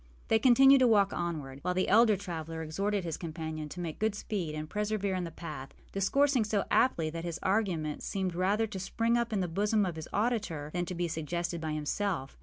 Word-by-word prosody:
They 220 - +4
continued 270 +3 +7
to 255 - +5
walk 205 -3 +4
onward, 150 -6 -4
while 180 +3 -1
the 185 - +1
elder 215 0 +5
traveller 165 -4 -5
exhorted 195 +5 -1
his 165 -3 -3
companion 160 -2 -5
to 180 - -8
make 165 -3 -5
good 215 -1 +1
speed 185 -7 -3
and 155 0 -4
persevere 210 +1 -1
in 185 -1 -1
the - - -5
path, 155 -5 -8 0.2
discoursing 265 +6 +2
so 210 -1 0
aptly 165 -11 +2
that 165 +1 -5
his 170 -1 -3
arguments 185 -7 0
seemed 190 -3 -2
rather 195 +5 +1
to 200 -3 -6
spring 230 +5 0
up 235 -1 0
in 205 -3 0
the 180 - -1
bosom 205 +4 +1
of 175 -3 -4
his 160 - -7
auditor 205 -10 -1
than 175 0 -1
to 180 - -4
be 175 0 -1
suggested 170 +1 -3
by 155 -1 -2
himself. 155 -1 -2
180 Hz, 210 wpm, -30 LUFS, 160-210 Hz, 0.2 s, continued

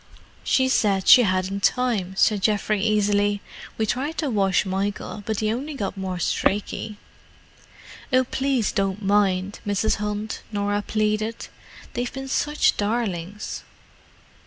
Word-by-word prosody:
"She 260 -1 +3
said 200 -6 +2
she 250 - +10
hadn't 190 -1 0
time," 215 -7 +1
said 210 0 +3
Geoffrey 210 0 +1
easily. 205 -1 +2 0.4
"We 220 - +1
tried 280 +8 -2
to 295 -5 -1
wash 195 -2 +2
Michael, 195 +2 -3
but 220 -1 -1
he 215 0 +1
only 280 +5 -4
got 200 -6 -3
more 190 -2 -4
streaky." 205 +4 -1 1.1
"Oh, 255 0 +4
please 265 -3 0
don't 195 +1 -1
mind, 195 -1 +1
Mrs. 205 +1 +1
Hunt," 210 +1 -3
Norah 205 0 0
pleaded. 215 +1 -1 0.4
"They've 245 0 -2
been 270 0 -6
such 295 +3 +1
darlings!" 205 -3 -2
210 Hz, 130 wpm, -24 LUFS, 195-230 Hz, 1.1 s, she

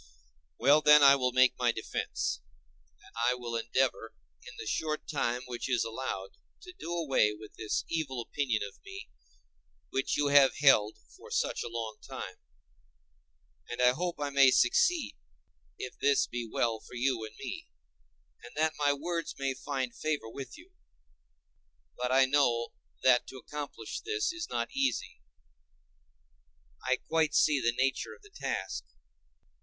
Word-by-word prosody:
Well, 150 +2 +5
then, 150 -1 +7
I 140 0 +9
will 125 -2 0
make 130 0 +5
my 120 -1 +3
defence, 110 - -3 0.6
and - - -18
I 120 +2 +2
will 120 -1 -5
endeavor 115 -1 0 0.3
in - - -12
the - - -7
short 155 +7 -2
time 125 -4 -1
which 125 +1 -5
is 125 -2 +2
allowed 115 -4 -5 0.2
to 365 - -11
do 170 - -7
away 140 -11 +2
with 105 0 -12
this 110 -1 -2
evil 155 -6 -2
opinion 120 -2 -1
of 100 - -10
me 395 +1 -9 0.8
which 135 - 0
you 145 -1 +2
have 140 -2 +6
held 120 -7 +4 0.2
for - - -14
such - - 0
a - - -4
long 115 -2 -5
time; - - -7 1.3
and 120 - -5
I 125 0 +6
hope 175 +6 -2
I 145 -1 -2
may 140 -1 +7
succeed, 355 - +3 0.6
if 125 - -7
this 140 -1 +3
be 120 -2 -5
well 115 -2 0
for 120 - -13
you 120 -2 0
and 110 0 -8
me, - - -7 0.8
and 120 - -12
that 155 +1 +1
my 145 -1 +3
words 165 +4 -3
may 135 -1 -1
find 130 -2 -4
favor 155 -6 -2
with 135 - -8
you. 345 +4 -16 1.2
But 125 0 -2
I 135 +1 +6
know 125 -4 +2 0.3
that 125 -1 +5
to 130 - -9
accomplish 140 -4 -6
this 420 -3 -1
is 345 0 -5
not - - -2
easy—I 65 - -6
quite 160 -2 +1
see 150 -3 +4
the 120 - +2
nature 135 +1 -1
of - - -24
the 415 - -17
task. 390 - -3
130 Hz, 155 wpm, -30 LUFS, 115-150 Hz, 1.3 s, I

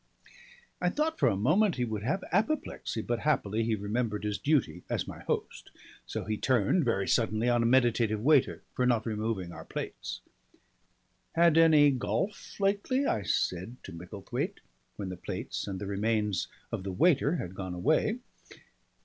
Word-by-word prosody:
I 180 - +3
thought 310 - -1
for - - +4
a 105 - 0
moment 165 - +3
he 125 - 0
would 110 -3 -3
have 140 - -1
apoplexy, 210 - -1
but 120 -1 -1
happily 115 -7 +1
he 110 0 +1
remembered 105 +1 -2
his 105 -1 -2
duty 130 - +1
as - - -1
my - - -8
host. - - -3 0.4
So - - -4
he 110 -1 -2
turned 130 - +2
very 100 -5 +1
suddenly 110 0 +1
on 120 -1 +3
a 115 - +2
meditative 120 -3 +3
waiter 140 +3 +3
for 125 - +1
not 120 -3 +2
removing 110 -5 -2
our 80 -1 -9
plates. - - -6 1.1
"Had 170 -1 +5
any 155 -3 +6
golf 190 - -3
lately?" 205 +8 +1
I 110 - +1
said 95 +3 -1
to - - -9
Micklethwaite, 105 - -5 0.3
when 100 -3 -5
the 90 - -6
plates - - -5
and 95 -2 -3
the 100 - -4
remains 105 -2 0 0.2
of - - -2
the 95 0 -4
waiter 150 - +3
had 90 - -4
gone 95 -2 -5
away. 155 - +2
115 Hz, 165 wpm, -30 LUFS, 100-155 Hz, 1.1 s, any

